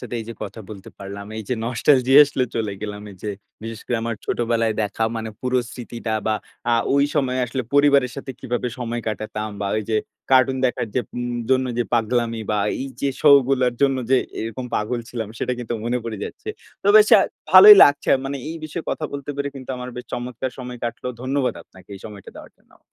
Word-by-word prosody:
সাথে - - -7
এই - - -7
যে 115 - -6
কথা 105 +2 -7
বলতে 100 -3 -10
পারলাম, 100 +1 -8
এই 110 - -4
যে 125 - +1
নস্টালজি 125 +2 +2
আসলে 140 -3 -1
চলে 110 -3 -1
গেলাম, 105 -1 -5
এই 95 - -13
যে 105 - -3 0.3
বিশেষ 115 -1 -6
করে, 120 - 0
আমার 115 0 -2
ছোটবেলায় 115 -2 0
দেখা 105 +2 -1
মানে 110 -1 -4
পুরো 130 0 +1
স্মৃতিটা 120 -2 -6
বা 110 - +2 0.4
আ - - +5 0.2
ঐ - - +2 0.2
সময়ে 130 -3 0
আসলে 130 +2 -3
পরিবারের 140 -3 +4
সাথে 135 -1 -6
কিভাবে 125 -1 -2
সময় 120 -1 -3
কাটাতাম 110 0 -4
বা 100 - -1
ওই 110 - -1
যে 110 - +2 0.3
কার্টুন 130 0 +4
দেখার 125 - -2
যে 125 - +2 0.2
উম 120 0 -3 0.2
জন্য 130 0 +3
যে 120 - +1
পাগলামি 115 0 0
বা 105 - +1 0.2
এই 135 - -4
যে 140 - +1
শো 150 - +5 0.2
গুলার 130 -3 +2
জন্য 135 -1 +3
যে 135 - +6 0.2
এরকম 115 +3 -5
পাগল 120 +3 -1
ছিলাম, 115 -4 -4
সেটা - - -1
কিন্তু 120 -1 -5
মনে 120 +1 0
পড়ে 115 -2 -4
যাচ্ছে। 430 - -9 0.3
তো - - +1
বেশ 425 - +7
আ - - +5 0.3
ভালোই 420 0 +11
লাগছে, 145 0 +1
মানে 140 +1 -3
এই 165 - -5
বিষয়ে 155 +2 -6
কথা 155 - -3
বলতে 140 0 -5
পেরে 140 0 -2
কিন্তু 135 -1 -8
আমার 125 0 -6
বেশ 125 - -6
চমৎকার 125 +1 -4
সময় 125 -1 -7
কাটল। 120 - -5 0.2
ধন্যবাদ 130 0 0
আপনাকে, 95 - -19
এই 95 - -11
সময়টা 105 -3 -10
দেওয়ার - - -11
জন্য। - - -28
120 Hz, 210 wpm, -22 LUFS, 110-130 Hz, 0.4 s, ভালোই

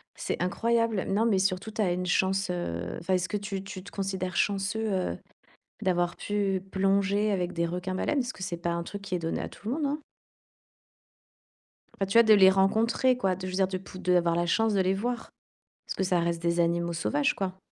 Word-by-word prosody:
C'est - - -3
incroyable. 230 +2 +1
Non, 210 +4 +2
mais 205 -5 +3
surtout, 190 +2 0
tu 220 - -2
as 190 -4 +2
une 180 +1 -2
chance, 190 +1 +1
heu 85 - -3
enfin, 180 +3 -1
est-ce 185 0 +1
que 210 - -1
tu 200 -1 -5
tu 190 -1 -8
te 200 - -11
considères 190 -2 -3
chanceux, 205 +2 0
heu, 185 - -1 0.7
d'avoir 175 -2 +1
pu 200 -2 -1
plonger 200 +2 +2
avec 180 -2 -1
des 170 -1 0
requins-baleines? 185 - -1
Parce 250 0 -2
que 190 - -11
c'est 175 -2 -3
pas 170 0 -2
un 170 0 -1
truc 200 +4 -7
qui 190 -2 -4
est - - +1
donné 165 -1 -2
à - - -4
tout 210 - -10
le 250 - 0
monde, 305 -2 -1
hein. 295 +2 -2 2.0
Enfin, 195 - +1
tu 195 +4 +1
vois? 235 - +9
De 220 -1 +6
les 190 -2 +8
rencontrer 225 +6 +3
quoi, 190 -6 +1
de 185 - -7
je 185 - -4
veux - - -3
dire 190 -1 +3
de 190 - -3
pou 185 0 -11
d'avoir 175 -2 +2
la 175 - +1
chance 220 +5 +2
de 195 - +3
les 185 +1 +2
voir. 235 +4 -3 0.5
Parce - - -5
que - - 0
ça 180 -1 +2
reste 170 0 -1
des 170 0 0
animaux 170 0 +1
sauvages, 145 -1 +1
quoi. 190 -1 -3
190 Hz, 225 wpm, -28 LUFS, 180-205 Hz, 2.0 s, vois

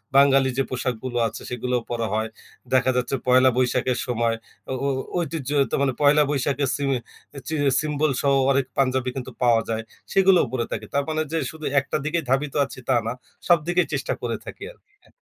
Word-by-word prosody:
বাঙালি 135 -1 +5
যে 135 - +3
পোশাকগুলো 125 -1 -3
আছে, 110 - -8
সেগুলাও 125 0 -1
পরা 115 -2 -1
হয়। 110 +1 0 0.4
দেখা 130 0 +4
যাচ্ছে 125 +2 0
পহেলা 130 +1 +6
বৈশাখের 125 0 +1
সময় 115 -1 +1 0.4
ও - - 0
ও - - +2 0.3
ঐতিহ্য 160 -5 -3 0.2
তো - - +2
মানে, 135 -2 +2
পহেলা 150 +1 +6
বৈশাখের 140 -1 0
সিমে, 140 -2 0 0.5
চি 160 - -2 0.3
সিম্বলসহ 145 -2 0 0.2
অনেক 135 -1 +2
পাঞ্জাবি 130 -1 +1
কিন্তু 130 -1 -5
পাওয়া 115 -2 +4
যায়, 110 0 -1 0.3
সেগুলোও 195 -2 +5
পরে 120 -3 -1
থাকি। - - -4
তার 140 0 +2
মানে 155 0 0
যে 165 - 0
শুধু 155 -1 -9
একটা 140 - -2
দিকেই 165 +1 0
ধাবিত 135 +1 +1
আছি, 135 - -10
তা 130 - +4
না। 115 - -1 0.3
সব 175 -1 +7
দিকেই 175 0 +2
চেষ্টা 135 -2 -1
করে 115 -2 -2
থাকি - - -9
আরকি, 415 -4 -26
হ্যাঁ। - - -24
135 Hz, 185 wpm, -24 LUFS, 125-145 Hz, 0.5 s, সব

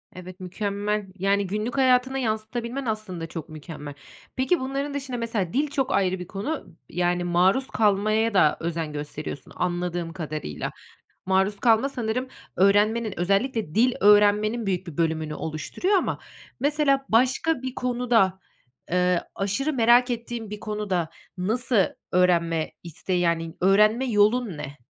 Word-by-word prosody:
Evet, 185 +1 -10
mükemmel. 205 +2 -2
Yani, 200 0 +1
günlük 215 +7 -3
hayatını 260 0 +3
yansıtabilmen 235 +3 -3
aslında 205 -7 -3
çok 165 -2 -7
mükemmel. 150 -2 -8 0.4
Peki, 265 +7 +1
bunların 275 +2 -3
dışında, 270 -3 -4
mesela, 225 -6 -2
dil 290 +3 +2
çok 270 -2 -1
ayrı 185 -1 +1
bir 180 - -7
konu, 200 - -5
yani, 175 0 0
maruz 185 +9 +2
kalmaya 215 +1 +2
da 155 -6 +4
özen 165 -2 -3
gösteriyorsun 145 -2 -6
anladığım 175 -1 -2
kadarıyla. 155 - -5 0.6
Maruz 190 +2 +1
kalma 230 +3 +4
sanırım 250 0 -2 0.3
öğrenmenin, 210 +3 +3
özellikle 200 - 0
dil 245 +3 +4
öğrenmenin 210 +2 +4
büyük 185 -1 -1
bir 160 - -8
bölümünü 160 -2 -1
oluşturuyor 160 - -1
ama - - -2 0.4
mesela 285 -1 +2
başka 260 +5 +2
bir 260 0 -4
konuda, 240 -6 +1 0.5
eee, 180 -1 +2
aşırı 205 +10 -1
merak 245 0 +4
ettiğin 235 -2 -4
bir 210 - -6
konuda 205 -6 -2 0.3
nasıl 225 +6 0 0.4
öğrenme 170 -3 +2
isteği, 175 +2 -3
yani, 165 -1 0
öğrenme 210 +6 +4
yolun 215 -3 +2
ne? 140 -3 -8
205 Hz, 130 wpm, -25 LUFS, 175-240 Hz, 0.6 s, da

